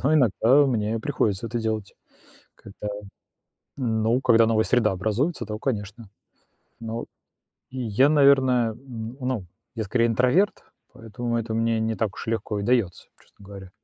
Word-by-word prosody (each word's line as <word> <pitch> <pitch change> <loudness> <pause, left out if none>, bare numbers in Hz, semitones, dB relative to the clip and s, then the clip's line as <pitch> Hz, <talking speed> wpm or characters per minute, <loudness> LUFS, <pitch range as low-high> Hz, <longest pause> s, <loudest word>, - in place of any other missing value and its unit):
н - - -13
но 155 +3 +3
иногда 130 +2 +4
мне 110 -3 -1
приходится 110 -5 -1
это 120 +1 -3
делать. 110 -3 -3 0.6
Когда, 100 +1 -9 0.9
ну, 115 -1 +1
когда 115 -3 +5
новая 110 -1 +2
среда 110 -4 +2
образуется, 110 - -1
то 105 0 -5
конечно. 105 -3 -4 0.7
Но 115 0 -5 0.7
я, 130 +1 +2
наверное, 135 -5 +4
н 115 -1 -9
ну, 125 -7 -3 0.3
я 110 - -3
скорее 115 +4 +1
интроверт, 125 - +1 0.3
поэтому 115 +2 -4
это 115 -1 -3
мне 115 0 +1
не 110 0 -1
так 110 -3 -2
уж - - -8
легко 110 -2 -2
и - - -3
дается, 115 -5 0
честно 100 - -21
говоря. 95 -2 -10
115 Hz, 145 wpm, -24 LUFS, 110-125 Hz, 0.9 s, когда